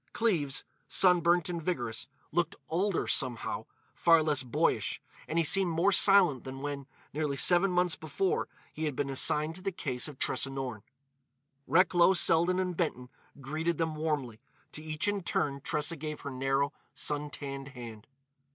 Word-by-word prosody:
Cleves, 165 - 0 0.2
sunburnt 175 -2 +3
and 175 -2 -4
vigorous, 120 -10 -3 0.2
looked 175 -2 0
older, 185 +3 0
somehow—far 150 +5 0
less 150 -3 +1
boyish—and 130 +5 -2
he 170 - +3
seemed 190 +3 +3
more 170 +4 +2
silent 190 -8 +6
than 135 0 -8
when, 140 -1 -5 0.3
nearly 145 -1 -2
seven 175 +7 +5
months 180 -1 +1
before, 160 +5 -2 0.3
he 155 - -4
had 150 -3 -3
been 140 0 -2
assigned 150 +3 +3
to 185 - -8
the 195 +1 -2
case 135 -8 -3
of 150 -3 -10
Tressa 135 - -1
Norne. 130 -5 -5 0.9
Recklow, 180 +1 +4
Selden 175 +1 +4
and 185 -1 -2
Benton 125 -7 -3 0.3
greeted 155 +4 -2
them 160 -1 -1
warmly; 145 -8 -3 0.3
to 155 - -6
each 155 +3 -2
in 205 -1 0
turn 140 -5 -1
Tressa 150 +4 0
gave 150 0 -6
her 140 - -6
narrow, 135 +2 -1 0.2
sun 150 0 -2
tanned 140 -2 -7
hand. 120 -5 -10
155 Hz, 150 wpm, -30 LUFS, 135-175 Hz, 0.9 s, silent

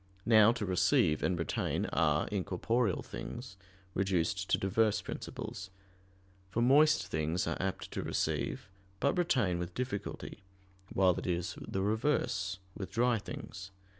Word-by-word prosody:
Now 110 -1 +7
to 120 -4 -3
receive 90 -4 +3
and 90 - +1
retain 85 -2 -1
are, 75 -2 +2
in 100 -3 -1
corporeal 105 +3 0
things, 120 -5 -7 0.4
reduced 95 -1 0
to - - +4
diverse 105 +2 +2
principles; 95 0 -6 0.8
for 115 +4 0
moist 150 +5 +5
things 80 +3 -1
are 85 - -1
apt 95 0 -3
to - - -3
receive, - - -1 0.3
but 140 - +2
retain 125 - +2
with 90 0 -5
difficulty, 125 -4 -4 0.5
while 95 -1 +4
it - - -6
is 90 0 -1
the 95 - -2
reverse 105 -4 0 0.2
with 95 -3 -5
dry 120 -1 +2
things. 95 -1 -8
95 Hz, 135 wpm, -32 LUFS, 90-115 Hz, 0.8 s, Now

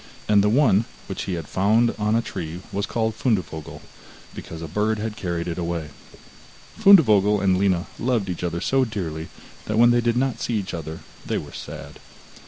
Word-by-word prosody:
And 105 -1 +5
the 105 - +3
one, 115 -3 +4 0.2
which - - -5
he 95 - -3
had 80 -3 -6
found 110 +5 +2
on 105 +1 +1
a 115 - +1
tree 85 -4 -6
was 100 +1 -2
called 110 -1 -1
Fundevogel, 95 - -2 0.5
because 80 0 -8
a - - -5
bird 105 +6 0
had 110 0 -4
carried 85 -5 -3
it 85 0 -3
away. 85 -3 -3 0.9
Fundevogel 110 - +6
and 95 -1 +3
Lina 95 -1 +1
loved 120 -4 0
each 90 -1 -4
other 85 -1 -2
so 135 0 +2
dearly 85 -9 -4 0.4
that 110 - -2
when 120 +1 +6
they 120 0 +3
did 120 0 +1
not 130 -1 0
see 120 - -1
each 100 -3 -3
other 80 -1 -6 0.2
they - - -2
were - - -7
sad. - - -9
105 Hz, 190 wpm, -23 LUFS, 85-115 Hz, 0.9 s, Fundevogel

